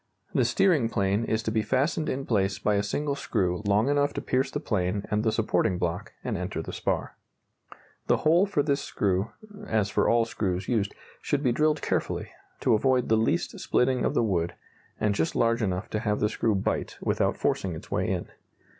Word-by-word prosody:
The - - +3
steering 175 - +3
plane 100 +1 +1
is 110 0 -1
to 110 - -1
be 110 0 +1
fastened 135 +8 0
in 135 +1 -2
place 100 -3 +1
by 105 - +1
a 100 - +2
single 140 +8 -1
screw 90 -10 -1
long 105 +4 +3
enough 145 0 +2
to - - -2
pierce 130 +2 +1
the 145 - -3
plane 100 - -1
and 105 0 +1
the 110 - +2
supporting 110 -4 +1
block, 90 +5 -3
and 120 - -2
enter 90 -2 -3
the - - -7
spar. - - -2 0.9
The - - +4
hole 170 +6 +5
for 150 -8 +1
this 140 -1 +1
screw 95 +1 0 0.4
(as 105 -2 +1
for - - +2
all 115 -1 +4
screws 95 -5 -2
used) 105 -4 0 0.3
should 145 0 -1
be 125 - +3
drilled 150 +4 +1
carefully, - - -1 0.3
to - - +3
avoid 125 +3 +2
the 110 - +5
least 110 -6 0
splitting 125 0 +1
of - - 0
the - - +3
wood, 85 -6 0 0.4
and 105 -1 +2
just 80 -4 -1
large 115 0 +2
enough 95 -3 -1
to 105 - 0
have 105 -2 0
the 105 - +2
screw 110 -1 0
"bite" 95 - -2
without - - 0
forcing 90 -3 -1
its - - -11
way - - 0
in. - - -2
110 Hz, 200 wpm, -27 LUFS, 100-130 Hz, 0.9 s, hole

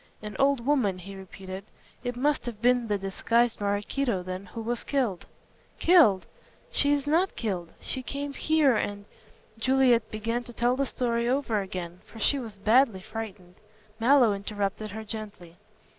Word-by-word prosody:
"An 210 -1 -6
old 275 -3 +3
woman," 255 -10 +2
he 195 +2 -9
repeated, 190 0 -8 0.4
"it 245 -1 -3
must 285 +1 0
have 230 -3 -5
been 245 0 +3
the 205 -1 +1
disguised 225 +4 +1
Maraquito 205 +1 0
then 185 +1 -6
who 225 +5 -7
was 240 +1 -2
killed." 245 -11 -1 0.5
"Killed! 305 - +5 0.5
She 285 - +3
is 290 -1 +1
not 335 +6 +2
killed. 185 -7 -3
She 260 - -2
came 280 +3 -4
here 300 -3 +3
and 205 -1 -2 0.3
" 215 - -31
Juliet 250 -2 +3
began 230 +3 -2
to 240 - -9
tell 240 +2 +2
the 275 +1 0
story 235 -1 0
over 250 -5 +1
again, 180 -2 -6
for - - -15
she 275 +6 +2
was 225 -5 -8
badly 220 0 +3
frightened. 195 -4 -8 0.4
Mallow 245 -2 +5
interrupted 200 +1 -3
her 220 +2 -6
gently. 205 -6 -8
225 Hz, 160 wpm, -27 LUFS, 200-260 Hz, 0.5 s, Killed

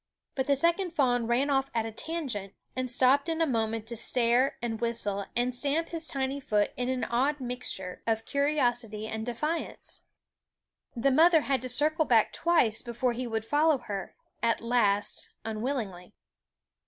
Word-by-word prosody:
But 265 -1 -2
the 280 - +4
second 340 +5 +2
fawn 245 -6 +1
ran 260 +5 +1
off 270 0 +1
at 225 -1 +1
a 225 - -5
tangent, 240 - -4 0.2
and 255 0 -2
stopped 265 +5 +3
in 325 0 -1
a 325 - +3
moment 225 -4 -1
to 235 +1 -5
stare 240 +3 +3
and 230 -2 -4
whistle 205 -4 0
and 245 +1 +1
stamp 290 +6 0
his 330 -1 0
tiny 270 0 -2
foot 210 -6 0
in 250 0 -2
an 260 -1 -1
odd 275 +5 0
mixture 245 -8 -3
of 225 0 0
curiosity 245 -7 0
and 220 0 -4
defiance. 300 +8 -3 1.0
SCHOOL - - -17
Of 230 - -4
The 275 - +4
mother 320 +3 +6
had 270 -3 0
to 255 - -3
circle 305 +5 +3
back 230 -5 +3
twice 315 -11 +2
before 240 +1 -1
^ - - -8
e 250 +1 -3
fll - - -8
we 290 +8 +2
d - - -18
her, 200 -2 -5 0.3
at 230 0 +1
last, 210 -4 +1 0.2
unwillingly. 220 -5 -4
250 Hz, 180 wpm, -28 LUFS, 225-280 Hz, 1.0 s, mother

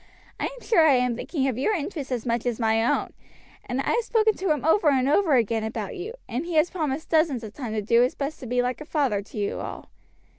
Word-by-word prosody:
I - - -1
am - - -6
sure 440 -8 +4
I 280 - +6
am 250 -1 +1
thinking 270 +2 -2
of 255 -2 -2
your 420 +11 +1
interest 295 -4 -4
as 240 -3 -2
much 235 0 -1
as 240 -1 -1
my 225 -1 +2
own; 235 - 0 0.5
and 250 +2 -2
I - - -1
have 470 - +2
spoken 440 -1 +2
to 380 -1 -2
him 295 -3 0
over 320 0 +4
and 265 -2 +2
over 305 0 +3
again 230 -2 +1
about 220 - -4
you, 415 +6 -6
and 250 +4 -3
he 340 -1 -4
has 310 +3 +3
promised 315 -4 -2
dozens 310 -7 +2
of 210 -2 -8
times 235 -5 -5
to 210 - -1
do 230 +3 +4
his 250 +2 +1
best 285 +2 -4
to 255 - -8
be 245 +1 +1
like 250 +3 -2
a - - -7
father 275 -10 0
to 205 - -12
you 205 -1 -2
all." - - -7
270 Hz, 260 wpm, -25 LUFS, 235-320 Hz, 0.5 s, I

